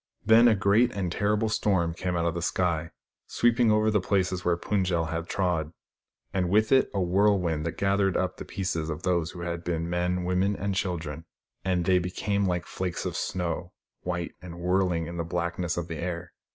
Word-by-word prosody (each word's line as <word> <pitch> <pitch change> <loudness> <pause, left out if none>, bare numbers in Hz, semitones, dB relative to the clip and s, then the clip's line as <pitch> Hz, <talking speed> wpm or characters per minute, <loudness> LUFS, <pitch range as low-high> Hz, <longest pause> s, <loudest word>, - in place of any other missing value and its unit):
Then 115 +2 +7
a 115 - +5
great 105 +5 +3
and 95 -4 -2
terrible 105 +3 +1
storm 95 -6 +1
came 90 +1 -3
out 85 -1 0
of 85 - +1
the 85 - -3
sky, 85 -2 0 0.4
sweeping 120 -1 +3
over 110 0 +3
the 105 -2 +2
places 95 -1 0
where 85 -1 +2
Pund 95 +1 0
jel 85 -3 +1
had 80 +1 -4
trod; 85 -4 -1 0.6
and 90 -2 0
with 110 +3 +3
it 135 -1 +5
a 100 - -2
whirlwind, 90 -4 +2
that 80 - -5
gathered 100 -1 +2
up - - -1
the - - -6
pieces 85 -4 -3
of 75 +2 -5
those 85 -3 +1
who 90 - -8
had 85 -1 -4
been 85 -1 -2
men, 90 +1 0
women 90 +3 +1
and 100 0 -2
children, 85 -5 -3 0.4
and 90 -2 0
they 90 0 +4
became 100 +3 -1
like 90 -1 -1
flakes 90 -2 -4
of - - -3
snow, 90 0 -3 0.3
white 90 -1 -3
and 90 -2 -9
whirlmg 90 -1 +1
in 85 +1 -6
the 85 - -1
blackness 85 +1 -2
of 85 -1 -2
the 80 -2 -5
air. 85 +1 -4
90 Hz, 200 wpm, -27 LUFS, 85-100 Hz, 0.6 s, Then